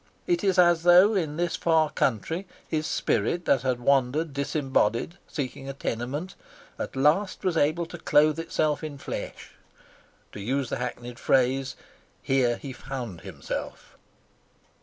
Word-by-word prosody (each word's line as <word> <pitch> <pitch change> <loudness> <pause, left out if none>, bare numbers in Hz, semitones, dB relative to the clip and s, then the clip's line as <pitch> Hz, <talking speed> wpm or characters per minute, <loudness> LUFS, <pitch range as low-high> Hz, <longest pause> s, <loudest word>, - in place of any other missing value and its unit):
It 350 - 0
is 190 -2 +2
as 175 -2 +5
though 180 +5 +7
in 160 -6 -1
this 175 0 0
far 160 -2 +2
country 160 - -1 0.2
his 155 -1 -1
spirit, 170 +12 0
that 135 - +3
had 125 -1 0
wandered 140 +4 +1
disembodied, 140 - 0
seeking 135 -1 -5
a - - -4
tenement, 135 +7 -4 0.5
at - - -5
last 155 +11 +2
was 185 -3 +1
able 160 +2 +2
to 170 0 -10
clothe 150 +1 +3
itself 155 -2 -1
in 150 -2 -5
flesh. - - -7 0.8
To - - -9
use 130 +5 -1
the - - -2
hackneyed 125 0 -6
phrase, 130 0 +1 0.5
here 125 -3 +2
he 135 -2 -7
found 125 -10 -6
himself. - - -7
145 Hz, 140 wpm, -26 LUFS, 130-165 Hz, 0.8 s, though